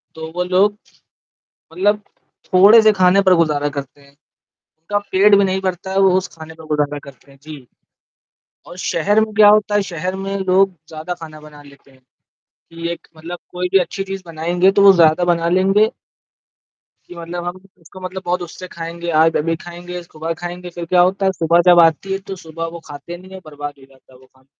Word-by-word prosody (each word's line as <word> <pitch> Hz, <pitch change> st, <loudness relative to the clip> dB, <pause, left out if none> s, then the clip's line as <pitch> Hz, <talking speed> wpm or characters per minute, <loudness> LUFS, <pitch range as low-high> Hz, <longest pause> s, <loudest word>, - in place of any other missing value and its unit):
तो 160 Hz, 0 st, -8 dB
वो 180 Hz, -, 0 dB
लोग 190 Hz, +3 st, +2 dB, 1.0 s
मतलब 205 Hz, +4 st, +1 dB, 0.5 s
थोड़े 200 Hz, +5 st, +7 dB
से 215 Hz, 0 st, +5 dB
खाने 185 Hz, 0 st, +4 dB
पर 190 Hz, -2 st, +4 dB
गुज़ारा 150 Hz, -3 st, +1 dB
करते 140 Hz, 0 st, -8 dB
हैं। 140 Hz, 0 st, -21 dB, 0.5 s
उनका 165 Hz, +6 st, -6 dB
पेट 200 Hz, +2 st, +5 dB
भी 200 Hz, -, +4 dB
नहीं 190 Hz, 0 st, -1 dB
भरता 185 Hz, 0 st, -4 dB
है, 190 Hz, -, -2 dB
वो 195 Hz, -1 st, +5 dB
उस 190 Hz, -, -2 dB
खाने 160 Hz, 0 st, -10 dB
पर 160 Hz, 0 st, -14 dB
गुज़ारा 150 Hz, -1 st, -1 dB
करते 140 Hz, 0 st, -16 dB
हैं, 135 Hz, -, -19 dB
जी। 150 Hz, -5 st, -11 dB, 1.0 s
और 175 Hz, -, -11 dB
शहर 195 Hz, +3 st, +1 dB
में 215 Hz, 0 st, -2 dB
क्या 210 Hz, -1 st, +7 dB
होता 210 Hz, 0 st, +3 dB
है, 205 Hz, -, +3 dB
शहर 180 Hz, -1 st, -4 dB
में 195 Hz, +1 st, -4 dB
लोग 190 Hz, 0 st, +2 dB
ज़्यादा 160 Hz, +3 st, -6 dB
खाना 160 Hz, -3 st, -11 dB
बना 150 Hz, -1 st, -14 dB
लेते 140 Hz, -1 st, -19 dB
हैं 130 Hz, -, -23 dB, 0.7 s
कि 165 Hz, 0 st, -6 dB
एक 170 Hz, -, -9 dB
मतलब 170 Hz, +2 st, -8 dB
कोई 180 Hz, 0 st, -3 dB
भी 195 Hz, -, +6 dB
अच्छी 195 Hz, +2 st, -3 dB
चीज़ 195 Hz, 0 st, -6 dB
बनाएँगे 175 Hz, +3 st, +1 dB
तो 200 Hz, +1 st, +2 dB
वो 200 Hz, -1 st, +8 dB
ज़्यादा 165 Hz, -1 st, +4 dB
बना 170 Hz, -1 st, +1 dB
लेंगे 195 Hz, +4 st, +3 dB, 1.2 s
कि 175 Hz, -, -12 dB
मतलब 170 Hz, +1 st, -6 dB
हम 175 Hz, +1 st, -5 dB, 0.2 s
उसको 170 Hz, +3 st, -14 dB
मतलब 185 Hz, +1 st, -6 dB
बहुत 180 Hz, +1 st, -1 dB
उससे 175 Hz, +1 st, -8 dB
खाएँगे, 170 Hz, 0 st, -7 dB
आज 165 Hz, 0 st, +2 dB
अभी 165 Hz, +2 st, -1 dB
खाएँगे, 175 Hz, +1 st, -8 dB
सुबह 165 Hz, 0 st, -6 dB
खाएँगे 175 Hz, +1 st, -6 dB
फिर 175 Hz, 0 st, -7 dB
क्या 180 Hz, +1 st, +3 dB
होता 190 Hz, +2 st, +1 dB
है, 190 Hz, -, +3 dB
सुबह 170 Hz, -1 st, +2 dB
जब 175 Hz, -, +6 dB
आती 165 Hz, +4 st, +1 dB
है 195 Hz, -, -2 dB
तो -, -, -4 dB
सुबह 165 Hz, -2 st, -7 dB
वो -, -, -11 dB
खाते 145 Hz, +4 st, -9 dB
नहीं 185 Hz, +2 st, -16 dB
हैं, 190 Hz, 0 st, -10 dB
बर्बाद 145 Hz, -1 st, -7 dB
हो 135 Hz, -, -16 dB
जाता 135 Hz, -1 st, -24 dB
है 125 Hz, -, -18 dB
वो 130 Hz, -, -20 dB
खाना। 130 Hz, 0 st, -29 dB
175 Hz, 205 wpm, -18 LUFS, 160-190 Hz, 1.2 s, वो